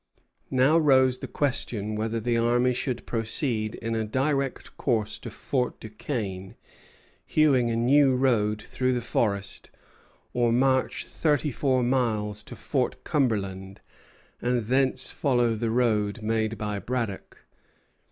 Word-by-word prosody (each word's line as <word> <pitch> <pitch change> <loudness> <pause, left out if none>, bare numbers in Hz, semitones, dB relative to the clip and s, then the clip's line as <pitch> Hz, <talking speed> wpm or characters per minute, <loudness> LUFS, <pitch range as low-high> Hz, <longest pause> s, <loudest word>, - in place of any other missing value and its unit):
Now 135 +5 +4
rose 130 -4 +4
the - - -6
question 115 -7 -1
whether 110 +1 -2
the 120 +2 0
army 120 +2 +2
should 125 -1 -3
proceed 115 -1 -1
in 115 0 -4
a 110 -1 0
direct 135 +4 -1
course 110 -5 -1
to 115 - -7
Fort 125 +3 -2
Duquesne, 105 -4 -5 0.7
hewing 135 -6 +3
a 115 - 0
new 130 +3 +4
road 110 -5 +1
through 130 0 -1
the 125 - -1
forest, 100 -4 -2 0.6
or 120 -1 +2
march 130 +2 +1
thirty 150 -2 0
four 130 0 +1
miles 110 -5 0
to - - -8
Fort - - -2
Cumberland, 100 -8 -1 0.6
and 120 -2 0
thence 130 +3 +1
follow 120 -5 +1
the 115 +1 -2
road 110 -2 +1
made 110 0 0
by 105 -2 -3
Braddock. 115 -4 -4
120 Hz, 130 wpm, -26 LUFS, 110-130 Hz, 0.7 s, Now